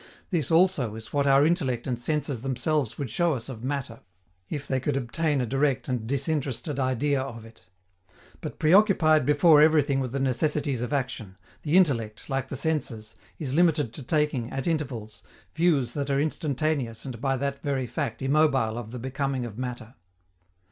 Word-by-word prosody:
This, 165 -7 0
also, 160 - +3
is 110 0 -10
what 140 -1 +2
our 135 +1 +5
intellect 130 -8 0
and 125 -3 -2
senses 145 -2 -2
themselves 135 0 -1
would 140 -6 -4
show 170 -3 +1
us 120 +1 -6
of 120 -3 -8
matter, 130 -4 -3 0.5
if 145 -2 -5
they 130 - 0
could 135 +1 -1
obtain 145 +4 -1
a 125 - 0
direct 135 +2 0
and 125 -4 -2
disinterested 140 +1 -2
idea 130 +2 +1
of 115 -4 -7
it. 115 -4 -17 0.8
But, - - -6
preoccupied 160 - +4
before 150 +1 +6
everything 150 -3 +4
with 130 -3 -2
the 135 - -2
necessities 140 0 0
of 125 - -3
action, 125 -8 -3 0.2
the 155 +3 +2
intellect, 115 - +1
like 135 -1 -1
the 140 - -5
senses, 135 -8 -3 0.2
is 140 -5 -4
limited 155 -7 +2
to - - -8
taking, 140 -3 0
at 135 0 -3
intervals, 125 -10 -3 0.3
views 150 -8 +2
that 140 -1 -3
are 140 0 +2
instantaneous 145 -5 -1
and 120 -4 -7
by 135 0 +1
that 140 +1 -3
very 135 -3 -1
fact 120 +1 -4
immobile 135 -5 +2
of 115 -2 -8
the 125 - -7
becoming 130 +1 -2
of 115 0 -8
matter. 125 -2 -5
135 Hz, 175 wpm, -26 LUFS, 125-150 Hz, 0.8 s, before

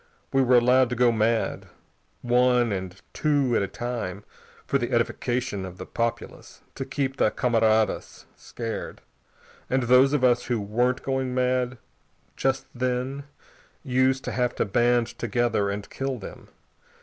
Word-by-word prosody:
We 135 - +4
were 125 -1 +4
allowed 125 +1 +4
to 125 - -2
go 125 0 +4
mad, 115 0 0 0.6
one 125 -1 +3
and 95 -1 -5
two 140 -5 +1
at - - +2
a 100 - -1
time, 110 -6 -5 0.4
for - - +1
the - - -3
edification 120 -5 -1
of 95 -1 -8
the 95 - -7
populace, 115 -1 -4
to 135 - -5
keep 135 0 -2
the - - +3
camaradas 110 -2 +1
scared. 115 -2 -6 0.7
And 130 0 +1
those 125 +3 +5
of 145 -3 +1
us 125 -1 +3
who 120 -2 -1
weren't 120 +5 0
going 130 -1 -2
mad 125 0 0 0.6
just 135 0 0
then 130 +2 -2 0.6
used 130 -1 +1
to - - -4
have 125 -1 -1
to - - 0
band 120 +3 +2
together 120 -5 0
and 100 +1 -4
kill 135 -1 -3
them. 105 - -10
125 Hz, 150 wpm, -25 LUFS, 115-130 Hz, 0.7 s, those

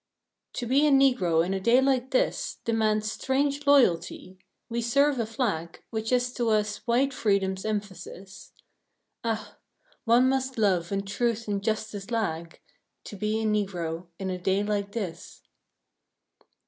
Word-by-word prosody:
To 245 - -4
be 275 +5 +3
a - - +4
Negro 250 - +3
in 190 - -2
a 195 - -1
day 235 +6 +4
like 265 -1 +1
this - - 0
Demands 215 -2 +1
strange 280 +3 -1
loyalty. 185 -8 +2 0.3
We 235 0 -2
serve 275 +3 +2
a 230 - -1
flag 210 -9 -3
Which 220 0 -3
is 250 0 +1
to 240 -3 -1
us 210 -1 +1
white 260 +4 +2
freedom's 195 -4 0
emphasis. 195 -2 -6 0.7
Ah! 220 -2 -4 0.5
one 240 +2 +5
must 265 -1 -1
love 185 -6 +2
when 195 0 -2
Truth 230 +2 -1
and 200 -1 -2
Justice 215 -1 -3
lag, 170 -8 -3 0.4
To - - -9
be 215 +2 -1
a - - -1
Negro 180 -5 -2
in 190 -1 -3
a 180 - -4
day 190 +3 +1
like 205 -1 -2
this. 185 -8 -6
215 Hz, 150 wpm, -27 LUFS, 195-245 Hz, 0.7 s, one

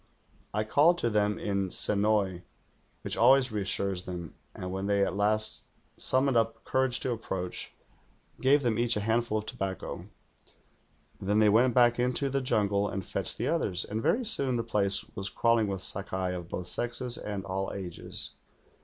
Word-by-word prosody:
I 105 +1 0
called 150 +10 +4
to 120 -8 0
them 105 -1 +1
in 100 -2 -1
Se - - +2
noi*, 100 -3 +1 0.6
which - - -3
always 130 +1 +5
reassures 100 -2 -1
them, 90 -3 -7 0.2
and 90 0 -5
when 95 +1 -3
they 100 -1 +3
at 90 - -3
last 105 +1 +1 0.3
sum 130 +1 +2
moned 135 -3 +1
up 115 0 0
courage 130 -2 0
to 130 - -1
approach, 95 -6 -4 0.7
gave 140 +2 +4
them 115 -2 +1
each 120 -2 +2
a - - -1
handful 115 +1 +1
of 105 - -4
tobacco. 95 -6 -5 1.1
Then 100 +2 0
they 110 -1 +5
went 120 +4 +4
back 120 -1 +5
into 125 +3 0
the 135 0 0
jungle 100 -4 +1
and 95 0 -4
fetched - - -3
the - - -1
others, 90 -1 0
and 110 +2 -3
very 245 - +1
soon 135 - +1
the 115 - -1
place 100 -4 +1
was 100 0 -3
crawling 115 -2 +2
with 95 -2 -3
Stlkai 95 -2 -1
of 90 -1 -7
both 90 - -4
sexes 120 +4 -1
and 100 -2 -5
all 95 +1 -3
ages. 90 -4 -5
105 Hz, 175 wpm, -29 LUFS, 95-120 Hz, 1.1 s, always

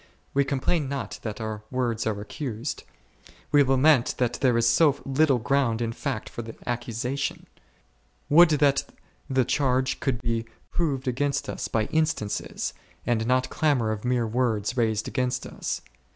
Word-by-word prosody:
We 140 - +4
complain 140 +2 0
not 140 -2 -4
that 110 -1 -5
our 110 -1 -4
words 120 -4 -1
are 105 -2 -1
accused; 120 +3 -5 0.7
we 145 - +6
lament 135 -1 +4
that 120 -1 +1
there 125 -3 +4
is 115 0 +3
so 145 +4 +4
little 135 0 +3
ground 120 -2 +1
in 115 -1 -1
fact 130 -3 -3
for - - -6
the 115 -1 -8
accusation. 120 +3 -3 0.8
Would 170 +3 +7
that 145 -2 +3 0.5
the 130 -2 +2
charge 130 -1 +1
could 135 -5 -1
be 115 -1 -1 0.3
proved 140 -6 -1
against 140 +2 0
us - - -3
by 110 -1 0
instances, 155 -10 -1 0.3
and 115 -2 +1
not 125 0 +2
clamour 135 -8 +2
of 105 -1 -4
mere 125 -1 +1
words 115 -1 0
raised 110 -3 +1
against 125 -1 -1
us - - -4
125 Hz, 150 wpm, -26 LUFS, 115-140 Hz, 0.8 s, Would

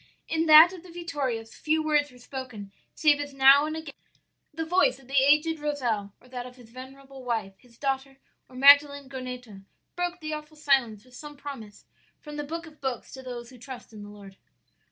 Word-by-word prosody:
"In 325 0 0
that 315 +4 +9
of 365 - -10
the 360 - -15
Vittorias 285 -10 -4
few 315 0 0
words 295 -2 +2
were 250 - -17
spoken 245 -6 -8 0.2
save 295 -2 +4
as 285 -1 -6
now 275 +2 +6
and 310 +1 -4
again 315 -3 -8 0.6
the 325 +1 -4
voice 340 -6 +2
of 270 -2 -19
the 270 - -11
aged 300 +3 +3
Rozel 240 -9 -2
or 250 - -21
that 250 -1 -6
of 250 - -13
his 240 -3 -17
venerable 265 +1 -12
wife, 225 -6 -2
his 240 -2 -23
daughter, 270 0 -3 0.3
or 255 - -16
Magdalen 285 +1 +6
Goneto, 250 -6 -8 0.3
broke 355 0 -2
the 310 -1 -5
awful 305 0 -8
silence 265 -7 +1
with 255 - -21
some 295 +3 -10
promise 265 -8 -9 0.3
from 295 -1 -10
the 295 - -4
Book 330 +3 -6
of 310 -2 -16
books 265 -3 -4
to 265 - -8
those 245 -2 -8
who 250 - -15
trust 250 -2 -10
in 210 - -10
the 205 - -10
Lord. 200 -2 -13
270 Hz, 200 wpm, -27 LUFS, 245-300 Hz, 0.6 s, that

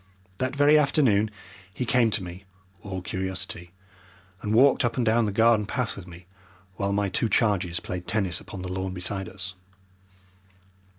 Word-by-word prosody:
That 130 +1 -1
very 145 +2 +6
afternoon 130 -8 +3 0.4
he 125 +6 -3
came 120 -1 +3
to 105 -2 -1
me, 90 +2 -9 0.4
all 95 -2 -6
curiosity, 95 -2 -4 0.7
and 105 - -3
walked 130 +5 +5
up 120 -1 0
and 125 - +1
down 115 +1 +3
the - - -1
garden 110 0 +3
path 125 +1 -2
with 95 -2 -10
me, 85 0 -12 0.5
while 100 +1 -1
my 100 0 +1
two 110 +4 0
charges 95 -7 +1
played 90 0 -6
tennis 95 -5 0
upon 95 -2 -8
the 90 0 -4
lawn 95 0 -3
beside 95 +1 -3
us. 95 0 -6
100 Hz, 165 wpm, -26 LUFS, 95-115 Hz, 0.7 s, very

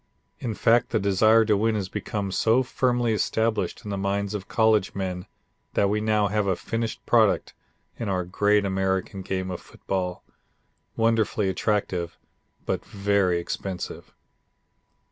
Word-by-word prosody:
In 115 -4 -3
fact, 115 +3 +3
the 110 - +1
desire 110 +3 +4
to 105 -1 +3
win 110 +2 +1
has 100 -3 -2
become 100 +1 -4
so 115 +6 +3
firmly 120 -2 +1
established 110 +1 0
in 105 - -4
the 100 - -2
minds 100 +1 -1
of 100 -2 -5
college 110 -3 +2
men 90 -2 -4 0.5
that 100 0 +3
we 105 0 0
now 105 -1 +2
have 105 0 0
a 95 - +2
finished 115 +4 -4
product - - +3 0.5
in 115 - -2
our 90 -2 0
great 105 +3 +2
American 95 0 -1
game 95 0 -3
of 90 - -5
football 90 -2 -4 0.7
wonderfully 110 -3 +1
attractive, 95 -3 -1 0.5
but - - -2
very 100 -3 +1
expensive. 90 +2 -5
100 Hz, 145 wpm, -25 LUFS, 95-110 Hz, 0.7 s, desire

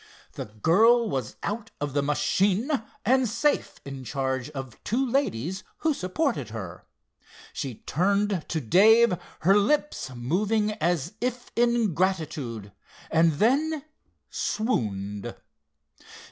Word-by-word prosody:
The - - -5
girl 215 - +4
was 130 - -3
out 220 +2 -3
of 145 -2 -3
the 145 - +2
machine 185 - +1 0.3
and 255 +1 +3
safe 265 +7 0
in 135 -1 -7
charge 130 0 -2
of 135 -4 -8
two 255 +5 0
ladies 190 - -1
who 315 -1 +1
supported 185 - -1
her. 95 -6 -8 0.7
She 130 -6 -5
turned 200 +1 +1
to 160 - 0
Dave, 215 - +5 0.3
her 190 +5 +5
lips 290 - +1
moving 205 - 0
as 175 -6 -1
if 245 0 -3
in 235 -4 +2
gratitude, 150 - -2 0.4
and 165 0 +4
then 285 - +1 0.5
swooned. 105 - -2
185 Hz, 115 wpm, -26 LUFS, -, 0.7 s, Dave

